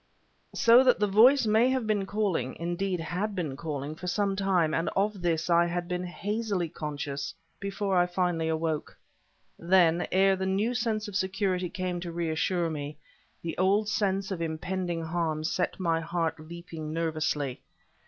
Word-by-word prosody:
So 235 +2 +7
that 255 -1 +4
the 210 - +3
voice 230 +7 +6
may 220 +4 +4
have 260 -3 0
been 205 -3 0
calling 195 - -1
(indeed, 175 +2 -2
had 180 +6 -3
been 160 -8 -3
calling) 145 -1 -4
for 175 +3 -8
some 195 +2 0
time, 185 -5 +1
and 165 - 0
of 200 0 0
this 165 -2 0
I 170 0 +4
had 175 0 -3
been 180 0 -2
hazily 200 0 -2
conscious 145 -2 -5 0.2
before 195 -2 +1
finally 175 -2 0
I 160 - +1
awoke. 160 -1 -2 0.6
Then, 175 -1 +3
ere 195 +1 +4
the 190 0 -2
new 205 +5 +1
sense 220 -3 -1
of 205 - -8
security 190 -1 0
came 180 -1 -3
to 175 -1 -5
reassure 170 +1 0
me, 145 -1 -5 0.5
the 165 - -3
old 200 +3 +3
sense 195 -2 0
of 180 -3 -3
impending 170 +1 -2
harm 160 -2 -1
set 180 +4 -1
my 165 -3 +1
heart 165 -1 -2
leaping 165 -1 -8
nervously. 155 -4 -1
180 Hz, 165 wpm, -28 LUFS, 165-195 Hz, 0.6 s, So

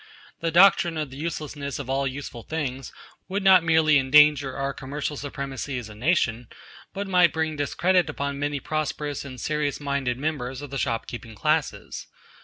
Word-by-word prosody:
The 165 - -1
doctrine 175 -1 +5
of 150 -3 -3
the 135 - -9
uselessness 150 -3 -4
of 140 - -6
all 135 +1 0
useful 130 -3 -6
things 135 -3 -4 0.4
would 195 +2 -2
not 190 -3 +7
merely 160 -2 +4
endanger 140 0 +5
our 135 0 -2
commercial 140 +3 -4
supremacy 140 -1 -5
as 115 -3 -6
a - - -10
nation, 120 - 0 0.4
but 200 +1 -4
might 180 -3 +5
bring 160 -1 -1
discredit 175 +5 +1
upon 140 -1 -3
many 145 0 -1
prosperous 150 0 -3
and 130 -3 -9
serious 150 +1 -1
minded 140 -4 -1
members 135 -2 -3
of 145 - -8
the 140 - -3
shop 115 -1 -1
keeping 115 -2 -8
classes. 155 +3 -1
145 Hz, 170 wpm, -25 LUFS, 135-155 Hz, 0.4 s, not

